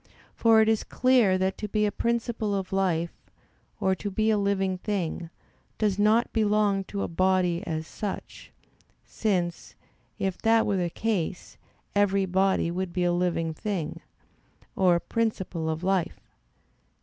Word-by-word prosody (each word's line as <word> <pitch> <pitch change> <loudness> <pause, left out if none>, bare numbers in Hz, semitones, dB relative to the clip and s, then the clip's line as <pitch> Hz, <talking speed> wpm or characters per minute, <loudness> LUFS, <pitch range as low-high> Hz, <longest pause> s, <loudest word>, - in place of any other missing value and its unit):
For 225 -1 +5
it 220 - +3
is 220 -1 +2
clear 245 -7 +3
that 190 +1 -1
to 210 - -3
be 210 +1 +1
a 205 - 0
principle 230 -3 -1
of 190 -1 -4
life, 170 -3 0 0.7
or 190 - +2
to 205 +2 -4
be 215 +3 +1
a 215 - +2
living 195 -2 0
thing, 180 -5 -3 0.5
does 205 -2 0
not 215 +3 +3
belong 210 -3 +2
to 200 0 -4
a - - -2
body 180 0 +1
as 160 -1 -3
such; 200 +4 -7 0.5
since, 180 -6 -2 0.4
if 195 -3 -2
that 225 0 +3
were 200 - 0
the 175 -2 0
case, 190 -3 -3 0.4
every 200 -1 +2
body 190 -2 +1
would 180 0 -3
be 180 - 0
a 175 0 +2
living 175 -2 0
thing, 190 -4 -4 0.7
or 180 -2 +4
a - - +1
principle 190 -7 -2
of 160 +2 -3
life. 190 -2 0
195 Hz, 150 wpm, -27 LUFS, 180-210 Hz, 0.7 s, For